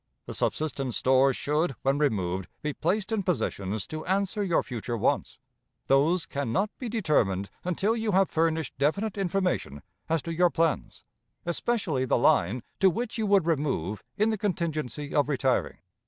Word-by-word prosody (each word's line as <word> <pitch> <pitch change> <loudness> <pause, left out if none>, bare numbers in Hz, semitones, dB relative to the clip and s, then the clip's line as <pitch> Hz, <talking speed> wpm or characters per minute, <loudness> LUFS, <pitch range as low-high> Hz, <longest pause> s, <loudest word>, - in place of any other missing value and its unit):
"The - - -6
subsistence 140 -5 -1
stores 130 0 +4
should, 150 0 0
when 135 +2 +2
removed, 95 -10 0 0.2
be 150 -1 -1
placed 195 +9 -1
in 220 -2 +1
positions 105 - -2
to 155 0 -6
answer 200 +2 0
your 185 -4 +2
future 120 -1 -4
wants. - - 0 0.5
Those 160 +6 +3
can 140 -4 -3
not 200 - +1
be 245 - -4
determined 115 - +1
until 190 +5 +1
you 220 -2 -1
have 190 0 +4
furnished 160 -2 0
definite 195 +9 +1
information 185 - -1 0.3
as 165 -1 +1
to 165 - -4
your 175 +2 +4
plans, 165 -2 -1 0.4
especially 170 - 0
the - - +2
line 115 0 +3 0.2
to 190 - +6
which 230 +5 -3
you 215 - 0
would 200 -4 +4
remove 135 - -1 0.2
in 215 +2 +3
the 215 - -2
contingency 155 - -2
of 145 0 +2
retiring. 135 -2 0
155 Hz, 160 wpm, -27 LUFS, 130-190 Hz, 0.5 s, to